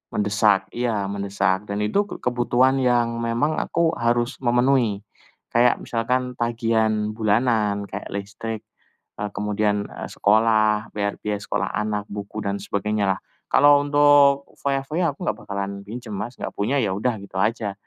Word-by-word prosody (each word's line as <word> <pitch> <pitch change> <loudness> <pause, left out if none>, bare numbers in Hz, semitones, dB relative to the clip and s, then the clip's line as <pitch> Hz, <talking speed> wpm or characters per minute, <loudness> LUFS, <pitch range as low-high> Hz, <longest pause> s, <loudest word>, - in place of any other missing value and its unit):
Mendesak, 105 -2 +2
iya 115 -4 -1
mendesak. 100 0 -1
Dan 100 +1 -2
itu 200 - +1
kebutuhan 125 -1 +1
yang 120 -2 +2
memang 120 +7 0
aku 170 -1 +1
harus 120 +2 0
memenuhi. 120 -4 +2 0.5
Kayak 120 +1 +3
misalkan 125 +2 -1
tagihan 110 -2 +1
bulanan 110 -1 +1
kayak 100 - -6
listrik, 105 +2 -5 0.6
eee, 105 0 -3
kemudian 105 0 0 0.2
sekolah, 110 0 +2
bayar 100 -1 -1
biaya 105 -1 -2
sekolah - - -2
anak, 105 0 -2
buku 100 +1 -6
dan 100 0 -1
sebagainya 105 +1 -1
lah. - - -15 0.3
Kalau 145 0 +6
untuk 145 -1 +5 0.2
foya-foya 140 +4 0
aku - - -21
enggak 105 0 -1
bakalan 100 0 -4
pinjem 115 0 -7
Mas, 120 +4 -4
enggak - - -5
punya, 115 +8 0
ya 105 - 0
udah 110 +3 -1
gitu 100 -1 -9
aja. 105 -1 0
110 Hz, 140 wpm, -23 LUFS, 105-125 Hz, 0.6 s, Kalau